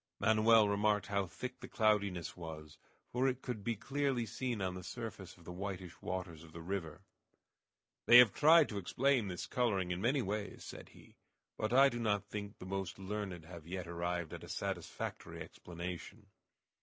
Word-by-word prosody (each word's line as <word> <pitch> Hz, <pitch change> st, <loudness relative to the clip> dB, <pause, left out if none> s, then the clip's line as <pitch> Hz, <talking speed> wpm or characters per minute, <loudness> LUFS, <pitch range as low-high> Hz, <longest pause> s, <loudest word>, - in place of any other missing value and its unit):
Manoel 110 Hz, 0 st, +6 dB
remarked 105 Hz, +1 st, +2 dB
how 100 Hz, -2 st, 0 dB
thick 125 Hz, +8 st, -6 dB
the 125 Hz, -, -8 dB
cloudiness 100 Hz, -6 st, +1 dB
was, 80 Hz, -3 st, -8 dB, 0.3 s
for 125 Hz, +2 st, +2 dB
it 130 Hz, 0 st, -1 dB
could 120 Hz, -5 st, -4 dB
be 115 Hz, +2 st, 0 dB
clearly 135 Hz, +1 st, 0 dB
seen 120 Hz, 0 st, -3 dB
on 95 Hz, -2 st, -1 dB
the 90 Hz, 0 st, -7 dB
surface 105 Hz, -4 st, -7 dB
of 85 Hz, -, -17 dB
the 90 Hz, -, -7 dB
whitish 90 Hz, -1 st, -6 dB
waters 90 Hz, -4 st, -4 dB
of 80 Hz, -1 st, -14 dB
the 85 Hz, -, -7 dB
river. 85 Hz, -4 st, -4 dB, 1.0 s
"They 120 Hz, -, +10 dB
have 125 Hz, -5 st, +9 dB
tried 160 Hz, 0 st, +7 dB
to 105 Hz, -, -3 dB
explain 125 Hz, +4 st, +2 dB
this 90 Hz, -2 st, -4 dB
coloring 100 Hz, -8 st, 0 dB
in 90 Hz, +1 st, -2 dB
many 130 Hz, +4 st, +2 dB
ways," 105 Hz, +1 st, -3 dB
said -, -, -9 dB
he, -, -, -18 dB, 0.4 s
"but 110 Hz, +1 st, -2 dB
I 135 Hz, +3 st, +7 dB
do 120 Hz, -3 st, -2 dB
not 105 Hz, -3 st, +1 dB
think 105 Hz, 0 st, -6 dB
the -, -, -9 dB
most 95 Hz, -1 st, -3 dB
learned 95 Hz, -3 st, -4 dB
have 85 Hz, -2 st, -10 dB
yet 90 Hz, 0 st, -4 dB
arrived 85 Hz, -1 st, -3 dB
at -, -, -7 dB
a -, -, -10 dB
satisfactory -, -, -4 dB
explanation." 90 Hz, +4 st, -7 dB
100 Hz, 180 wpm, -35 LUFS, 90-115 Hz, 1.0 s, They